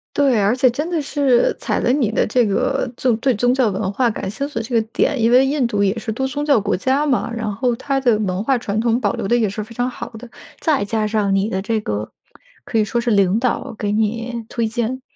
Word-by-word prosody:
对， 270 -7 +3
而 200 +3 +3
且 255 0 +3
真 295 +8 -3
的 335 -3 0
是 275 -4 +2
踩 - - -1
了 - - 0
你 245 -7 +1
的 - - +1
这 240 +2 +2
个 245 +5 0
就 250 -3 +2
对 260 +2 +1
宗 245 +4 +2
教 255 -4 +2
文 190 0 -2
化 245 0 +2
感 200 -3 -4
兴 275 +8 -3
趣 290 - -15
的 230 - 0
这 235 +2 -4
个 225 - +4
点。 275 -1 +1
因 230 +1 +3
为 255 +2 +6
印 275 -2 +1
度 205 -3 -1
也 200 +2 +1
是 225 0 -4
多 265 +4 -2
宗 290 +2 -3
教 280 -7 +4
国 205 +1 0
家 265 +9 +1
嘛， 260 -4 0
然 230 -2 -3
后 245 +4 0
它 275 -1 -1
的 240 -4 +3
文 190 -1 -1
化 265 +2 +2
传 215 -3 -3
统 235 0 +1
保 205 -5 0
留 - - -4
得 240 +4 +2
也 220 -3 +1
是 210 +2 -4
非 230 - -12
常 245 +2 -1
好 - - -7
的， 240 +2 -11 0.3
再 300 -9 +1
加 215 +1 -1
上 205 -2 0
你 195 +1 +1
的 190 -3 -2
这 220 +2 -1
个 105 - -4 0.5
可 230 - -2
以 215 - +4
说 235 +3 -1
是 235 0 -1
领 200 +1 +3
导 250 -1 -1
给 205 -1 -1
你 230 +2 -1
推 230 -2 -1
荐。 240 +3 -2
235 Hz, 280 characters per minute, -19 LUFS, 210-260 Hz, 0.5 s, 为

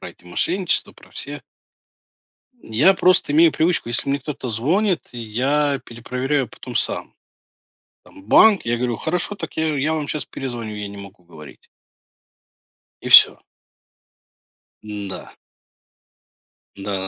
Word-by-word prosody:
про - - -8
эти - - -18
мошенничества, 175 - 0
про - - -19
все - - -6 1.2
Я 130 - +3
просто 185 -5 +3
имею 165 +2 +6
привычку, 160 -6 0
если 120 - -1
мне 140 +1 0
кто-то 140 -1 -6
звонит, 170 - 0
я 135 +5 0
перепроверяю 125 +3 -3
потом - - -11
сам. - - 0 0.9
Там 95 - -17
банк, 210 - +5
я 120 0 -1
говорю: 120 -1 -1
"Хорошо, 180 - -2
так - - -7
я 160 -2 0
я 145 +3 0
вам 155 -2 -3
сейчас 150 - -3
перезвоню, 120 -5 -6
я 105 -1 -6
не 100 - -10
могу 100 -1 -12
говорить". 80 -4 -15 1.4
И - - -5
всё. - - +8 1.4
М-да. 105 -2 -7 1.4
Да 100 - -9
да 100 0 -3
130 Hz, 130 wpm, -21 LUFS, 110-160 Hz, 1.4 s, всё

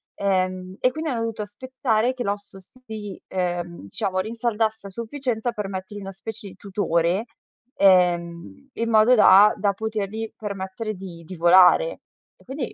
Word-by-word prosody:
ehm, 185 -1 -1
e 255 - +3
quindi 315 +2 -4
hanno 230 -2 -2
dovuto 225 -2 -3
aspettare 245 +2 -1
che 250 -1 -4
l'osso 200 -1 -5
si, 215 -1 -9
ehm, 175 - -3
diciamo 185 - -3
rinsaldasse 220 -1 -1
a - - -8
sufficienza 235 +1 -3
per 210 -3 -4
mettergli 190 +2 -6
una 195 0 -7
specie 200 +1 -7
di - - -14
tutore, 185 -1 0 0.5
ehm, 175 +5 +2
in 230 0 -2
modo 220 +3 +5
da 210 -1 +7
da 200 0 +2
potergli 220 +1 -4
permettere 200 +1 -5
di 180 -3 -10
di 185 - -8
volare 185 - +5 0.4
e - - -23
quindi 265 -1 -5
205 Hz, 150 wpm, -23 LUFS, 185-225 Hz, 0.5 s, da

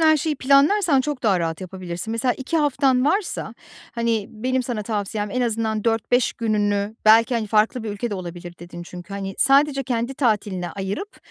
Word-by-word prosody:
her 315 -1 +5
şeyi 300 0 -1
planlarsan 280 +4 +4
çok 275 -1 -4
daha 195 -5 +2
rahat 165 +1 -2
yapabilirsin. 185 +2 -6
Mesela 245 +2 0
2 265 +5 -3
haftan 270 -3 +2
varsa, 380 +5 -1 0.4
hani, 230 -3 -1
benim 255 +4 -1
sana 235 -3 -3
tavsiyem 205 -1 -3
en 255 - -1
azından 225 -2 -1
4-5 230 +2 +1
gününü 205 -2 0
belki, 230 +3 +6
hani, 220 -2 -1
"Farklı 220 +3 +2
bir 220 - -4
ülke 210 +3 -4
de - - -2
olabilir" 175 -1 -7
dedin 175 0 -9
çünkü, 175 +2 -10
hani, 195 -1 -5
sadece 275 0 +4
kendi 240 0 -2
tatiline 205 -8 0
ayırıp 200 - -5
225 Hz, 175 wpm, -22 LUFS, 200-265 Hz, 0.4 s, belki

